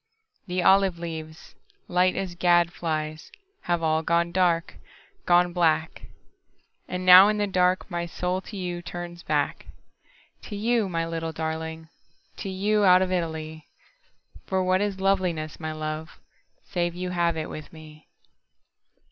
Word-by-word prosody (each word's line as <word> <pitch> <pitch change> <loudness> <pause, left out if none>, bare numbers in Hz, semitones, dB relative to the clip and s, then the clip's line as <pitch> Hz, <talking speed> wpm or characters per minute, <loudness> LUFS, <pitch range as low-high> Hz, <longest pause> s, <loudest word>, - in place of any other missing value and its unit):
The 180 0 -1
olive 195 -2 +4
leaves, 160 -1 -8 0.3
light 180 +1 +2
as 190 -2 -3
gad 175 -1 +3
flies, 155 -2 -4 0.3
Have 175 -1 0
all 160 0 +2
gone 170 +1 +1
dark, 175 -1 +1 0.5
gone 175 0 +4
black. 160 -2 0 0.8
And 180 0 -4
now 185 +2 +10
in 210 0 +1
the 205 - +1
dark 185 -1 +1
my 170 0 -2
soul 180 +2 -2
to 205 - -9
youTurns 175 -1 -6
back. 150 -2 -1 0.8
To 210 - -7
you, 220 0 +1
my 165 -2 -1
little 165 -1 -4
darling, 160 0 -5 0.5
To 195 - -5
you, 205 +3 +1
out 185 -1 +6
of 185 - -3
Italy.For 160 +2 -6
what 185 +1 +2
is 205 -2 -2
loveliness, 180 -5 0
my 155 -1 -4
love, 155 0 -6 0.5
Save 175 -1 -1
you 180 0 -4
have 170 -2 0
it 155 - -3
with 155 - -9
me! 155 -1 -14
175 Hz, 140 wpm, -25 LUFS, 160-185 Hz, 0.8 s, now